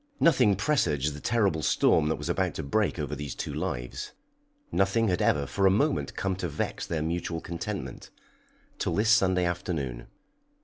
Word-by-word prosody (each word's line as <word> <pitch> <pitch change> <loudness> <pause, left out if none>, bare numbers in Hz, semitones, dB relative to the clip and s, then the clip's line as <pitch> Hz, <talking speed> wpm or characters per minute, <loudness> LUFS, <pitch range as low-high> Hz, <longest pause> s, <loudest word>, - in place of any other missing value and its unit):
Nothing 125 -11 +4
presaged 75 - +1
the 75 - -8
terrible 100 -5 +1
storm 75 +2 +3
that 80 - +1
was - - -6
about - - 0
to - - -4
break 100 +9 0
over 75 -1 -3
these 75 -1 -5
two - - -4
lives. - - -4 0.6
Nothing 100 +3 +2
had 90 - 0
ever 70 -1 +2
for 95 +6 +2
a - - +6
moment 80 -7 +1
come 95 -1 -1
to 90 -3 -3
vex 70 - -3
their 80 -2 -1
mutual 85 0 -2
contentment, 85 0 -6 0.7
till - - -1
this 110 +2 +3
Sunday 95 -4 +4
afternoon. 80 -8 -3
85 Hz, 170 wpm, -28 LUFS, 75-100 Hz, 0.7 s, a